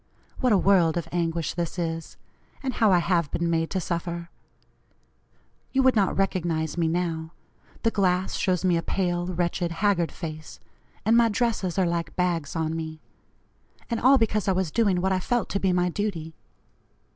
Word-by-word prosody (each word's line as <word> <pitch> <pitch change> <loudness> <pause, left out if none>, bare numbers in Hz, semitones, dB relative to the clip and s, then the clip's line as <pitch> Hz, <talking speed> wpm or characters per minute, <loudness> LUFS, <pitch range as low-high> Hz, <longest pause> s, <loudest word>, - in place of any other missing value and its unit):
What 255 -3 +2
a 205 - +6
world 180 -4 +3
of 165 -2 -3
anguish 165 -2 -1
this 170 0 -3
is 165 -1 -4 0.5
and 260 -1 -1
how 220 -3 +3
I 180 - +6
have 170 -3 +1
been 170 +2 -1
made 165 0 0
to 190 - -1
suffer! 170 -1 -4 1.4
You 265 0 +3
would 260 -1 +4
not 200 -4 +2
recognize 170 -5 0
me 170 -2 +1
now. 165 -1 -2 0.5
The 225 - +3
glass 185 -2 +1
shows 185 -1 0
me 175 -2 +3
a - - 0
pale, 175 -1 -1
wretched, 175 -1 -1
haggard 175 -1 +1
face, 155 -2 -8 0.5
and 225 +2 +4
my 235 -1 +5
dresses 215 -5 -1
are 190 - +3
like 170 -2 -2
bags 175 -5 -1
on 160 0 -1
me. 160 -1 -5 0.9
And 230 - 0
all 265 +3 +6
because 215 -4 0
I 190 - +3
was 185 -3 -1
doing 200 -5 +2
what 190 +1 +1
I 185 - +2
felt 240 +5 -1
to 200 - -1
be 190 -1 +1
my 180 0 +2
duty. 175 -5 -3
175 Hz, 180 wpm, -26 LUFS, 165-195 Hz, 1.4 s, a